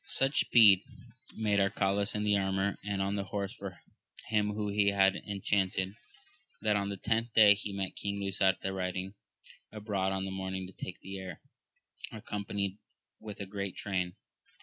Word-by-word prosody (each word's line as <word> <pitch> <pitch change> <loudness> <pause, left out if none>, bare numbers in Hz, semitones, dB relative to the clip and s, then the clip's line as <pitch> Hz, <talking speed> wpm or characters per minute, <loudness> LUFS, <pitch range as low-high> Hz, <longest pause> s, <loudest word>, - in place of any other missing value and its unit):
UCH 135 +2 +3
speed 105 -6 +7 0.6
made 105 -2 +2
Arcalaus 100 0 +1
in 105 - -1
the 105 -1 +3
armour 95 0 0
and 100 -1 -1
on 100 +1 -1
the 100 -1 -2
horse 100 0 -3
of 100 -2 -5 0.6
him 105 -1 +1
whom 105 -1 -2
he 100 -1 +3
had 95 -1 +4
en 100 -1 -4
chanted, 95 -1 0 0.7
that 105 -1 +3
on 100 -1 0
the 100 - -4
tenth 115 +4 0
day 105 -2 +9
he 105 0 -5
met 100 -1 -3
King 100 0 -3
Lisuarte 95 -1 +1
riding 95 0 -3 0.6
abroad 100 -3 -1
in 95 - -2
the 95 - -4
morning 95 0 -4
to 95 - -11
take 90 - -7
the 95 +1 -6
air, 90 -4 -7 0.7
accompanied 100 -2 -4 0.4
with 105 -2 -9
a 100 - -4
great 100 -1 -4
train. 90 -3 -2
100 Hz, 170 wpm, -31 LUFS, 95-105 Hz, 0.7 s, day